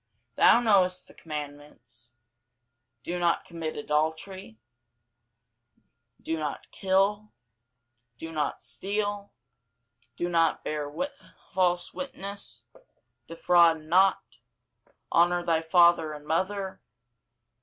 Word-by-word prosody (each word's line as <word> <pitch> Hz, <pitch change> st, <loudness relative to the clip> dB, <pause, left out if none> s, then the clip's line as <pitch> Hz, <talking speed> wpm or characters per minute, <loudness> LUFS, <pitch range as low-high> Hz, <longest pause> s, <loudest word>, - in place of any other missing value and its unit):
Thou 235 Hz, -, +6 dB
knowest 190 Hz, -5 st, +3 dB
the -, -, -16 dB
commandments, 145 Hz, -6 st, -9 dB, 0.9 s
Do 175 Hz, +1 st, -3 dB
not 175 Hz, -1 st, +1 dB
commit 165 Hz, -2 st, -5 dB
adultery, 160 Hz, -, -2 dB, 1.6 s
Do 160 Hz, 0 st, -3 dB
not 150 Hz, -2 st, -5 dB
kill, 200 Hz, +2 st, +1 dB, 0.9 s
Do 165 Hz, +5 st, -7 dB
not 150 Hz, -2 st, -2 dB
steal, 200 Hz, -, -3 dB, 0.8 s
Do 175 Hz, -, -2 dB
not 165 Hz, -2 st, +1 dB
bear 150 Hz, -1 st, -3 dB, 0.6 s
false 175 Hz, -1 st, 0 dB
witness, 200 Hz, -7 st, -7 dB, 0.6 s
Defraud 165 Hz, -1 st, +3 dB
not, 185 Hz, +5 st, +2 dB, 0.7 s
Honour 175 Hz, +1 st, +3 dB
thy 165 Hz, -2 st, +1 dB
father 165 Hz, -1 st, +4 dB
and 150 Hz, 0 st, -10 dB
mother. 190 Hz, +4 st, -2 dB
170 Hz, 90 wpm, -27 LUFS, 155-190 Hz, 1.6 s, Thou